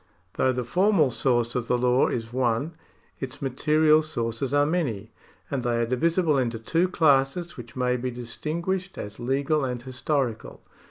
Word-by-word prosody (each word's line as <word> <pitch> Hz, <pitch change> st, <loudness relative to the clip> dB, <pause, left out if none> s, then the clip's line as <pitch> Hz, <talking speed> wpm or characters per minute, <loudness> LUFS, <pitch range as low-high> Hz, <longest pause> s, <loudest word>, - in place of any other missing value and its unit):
Though 130 Hz, -, +2 dB
the 125 Hz, 0 st, -2 dB
formal 175 Hz, -, +3 dB
source 120 Hz, -1 st, +1 dB
of 125 Hz, -2 st, -2 dB
the 125 Hz, -, +2 dB
law 125 Hz, +1 st, +3 dB
is 115 Hz, -1 st, -4 dB
one, 125 Hz, +4 st, 0 dB, 0.5 s
its 130 Hz, 0 st, -6 dB
material 155 Hz, +3 st, +3 dB
sources 120 Hz, -4 st, -3 dB
are 145 Hz, 0 st, +3 dB
many, 135 Hz, -, -2 dB, 0.4 s
and 140 Hz, -2 st, -1 dB
they 120 Hz, -1 st, 0 dB
are 115 Hz, -, +2 dB
divisible 155 Hz, +4 st, +1 dB
into 120 Hz, -3 st, -1 dB
two 165 Hz, +11 st, +1 dB
classes 155 Hz, +1 st, +2 dB
A\'hich 120 Hz, -4 st, -11 dB
may 125 Hz, -1 st, +1 dB
be 125 Hz, +1 st, -3 dB
distinguished 165 Hz, +10 st, -4 dB
as 105 Hz, +2 st, -7 dB
legal 140 Hz, +4 st, 0 dB
and 125 Hz, -2 st, -2 dB
historical. 130 Hz, -1 st, -3 dB
130 Hz, 160 wpm, -25 LUFS, 120-155 Hz, 0.5 s, formal